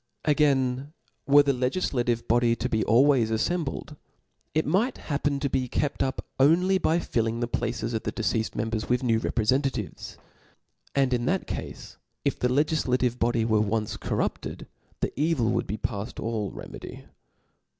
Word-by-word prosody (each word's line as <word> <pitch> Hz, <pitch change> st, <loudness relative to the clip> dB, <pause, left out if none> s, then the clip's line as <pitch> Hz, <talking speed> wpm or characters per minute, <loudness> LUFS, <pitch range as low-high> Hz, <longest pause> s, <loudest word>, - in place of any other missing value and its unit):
Again, 140 Hz, -2 st, +2 dB, 0.3 s
were 145 Hz, +1 st, +7 dB
the 140 Hz, -, +2 dB
legiflative 125 Hz, -3 st, 0 dB
body 120 Hz, 0 st, +3 dB
to 115 Hz, +2 st, -2 dB
be 110 Hz, -3 st, 0 dB
always 125 Hz, 0 st, +4 dB
affembled, 150 Hz, +5 st, -2 dB, 0.6 s
it 155 Hz, -, +2 dB
might 205 Hz, -, +1 dB
happen 145 Hz, -1 st, -1 dB
to 140 Hz, -, 0 dB
be 130 Hz, -1 st, -1 dB
kept 140 Hz, +3 st, -1 dB
up 130 Hz, -1 st, -1 dB
only 180 Hz, +7 st, +4 dB
by 165 Hz, -2 st, +2 dB
filling 115 Hz, -8 st, -1 dB
the 120 Hz, -, -1 dB
places 115 Hz, 0 st, -2 dB
of 110 Hz, -, -1 dB
the -, -, -3 dB
deceafed 110 Hz, -1 st, -1 dB
members 110 Hz, 0 st, -2 dB
with 125 Hz, +1 st, +1 dB
new 115 Hz, -3 st, +2 dB
reprefentatives; 130 Hz, +5 st, -1 dB, 0.8 s
and 135 Hz, -2 st, +3 dB
in 120 Hz, -1 st, 0 dB
that 185 Hz, +7 st, 0 dB
cafe -, -, -5 dB, 0.5 s
if -, -, 0 dB
the 125 Hz, -, +1 dB
legiflative 130 Hz, -3 st, +1 dB
body 115 Hz, -1 st, +2 dB
were 110 Hz, -2 st, +3 dB
once 105 Hz, 0 st, -1 dB
corrupted, -, -, -3 dB, 0.4 s
the -, -, -1 dB
evil 145 Hz, -6 st, +1 dB
would -, -, -1 dB
be 105 Hz, -, -3 dB
paft, 105 Hz, +2 st, -4 dB
all 110 Hz, -3 st, -2 dB
remedy. -, -, -9 dB
125 Hz, 155 wpm, -26 LUFS, 115-145 Hz, 0.8 s, were